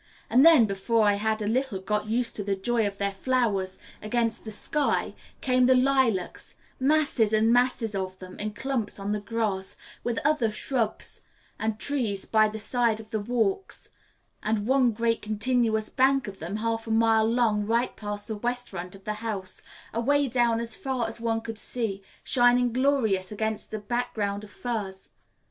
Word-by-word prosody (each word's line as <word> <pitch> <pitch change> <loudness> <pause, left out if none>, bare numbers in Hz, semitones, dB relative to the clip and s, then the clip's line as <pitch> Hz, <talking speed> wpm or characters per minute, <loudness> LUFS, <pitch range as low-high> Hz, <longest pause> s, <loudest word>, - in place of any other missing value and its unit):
And 255 - +6
then, 320 -8 +8
before 210 +2 +1
I 205 - +5
had 215 +1 -1
a - - -2
little 250 -1 0
got 210 +2 -2
used 235 +2 0
to 205 - -2
the 200 0 0
joy 225 +3 0
of 200 -1 -6
their 200 0 0
flowers 195 -4 0 0.2
against 230 +1 -1
the - - -5
sky, 290 +7 0 0.3
came 255 -1 +3
the 260 - +6
lilacs 255 -8 +1 0.2
masses 275 -6 +2
and 220 +2 +4
masses 245 -3 +2
of 190 -1 -3
them, 185 -1 -11
in 210 0 -3
clumps 260 -3 -2
on 200 0 -3
the 210 - 0
grass, 205 -3 -2 0.3
with 240 -1 -2
other 295 -7 +3
shrubs 225 +1 -1 0.4
and 220 -1 -1
trees 220 -7 +2
by 215 -1 +4
the 215 +1 -5
side 225 +1 +1
of 220 +1 -12 0.2
walks, 235 - -1 0.5
and 215 -1 -1
one 260 0 +4
great 230 +1 0
continuous 220 0 0
bank 270 -1 +2
of 195 -1 -8
them 175 +5 -4
half 225 +1 -2
a - - -5
mile 225 0 +3
long 230 -3 +2
right 230 +4 0
past 205 -1 -4
the 220 - -3
west 245 +3 -2
front 180 0 -7
of 195 - -15
the 215 - -2
house, 200 -5 -4 0.3
away 280 +5 +2
down 235 -2 +2
as 230 -1 -2
far 255 -3 -2
as 225 +1 -5
one 225 -1 0
could 225 -1 -5
see, 220 -5 -3 0.2
shining 245 -1 +3
glorious 235 -8 +1
against 220 0 -3
a 215 - -3
background 210 -2 -2
of 210 - -10
firs. 205 -5 -4
225 Hz, 175 wpm, -27 LUFS, 205-245 Hz, 0.5 s, then